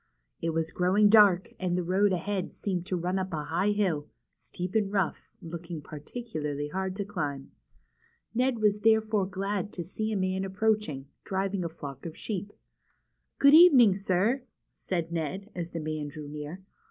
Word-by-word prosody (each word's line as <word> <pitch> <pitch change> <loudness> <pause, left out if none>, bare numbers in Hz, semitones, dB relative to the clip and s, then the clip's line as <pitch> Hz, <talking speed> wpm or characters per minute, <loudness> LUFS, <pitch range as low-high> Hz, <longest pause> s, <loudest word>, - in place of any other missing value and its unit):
It 165 - -1
W'as 165 0 -1
growing 190 +4 +4
dark, 205 -4 +5
and 180 -1 0
the 180 - 0
road 190 +3 +2
ahead 185 +1 -2
seemed 180 -3 -3
to 185 - -1
run 180 +2 -1
up 190 0 -3
a 150 -2 -2
high 170 +7 0
hill, 185 -8 0 0.3
steep 180 +1 -6
and 210 -3 +1
rough, 195 -4 -1
looking 170 0 -6
particularly 150 -2 -5
hard 190 +3 -3
to 200 0 -3
climb. 145 -9 -4 0.8
Ned 255 +2 +2
w^as 210 -2 +1
therefore 220 -3 +3
glad 195 +1 -3
to 175 - -4
see 215 +6 -3
a 210 - 0
man 190 0 0
approaching, 195 -7 0 0.2
driving 195 0 -1
a 170 - -2
flock 140 -2 -8
of 160 - -9
sheep. 205 -1 -4 0.5
" - - -50
Good 280 +1 +6
evening, 280 - +8
sir," 200 +6 +1 0.3
said 170 -3 -3
Ned, 180 +6 -3
as 170 -2 -4
the 170 - -5
man 155 -1 -3
drew 145 +1 -8
near. 150 +5 -7
185 Hz, 170 wpm, -28 LUFS, 165-205 Hz, 0.8 s, evening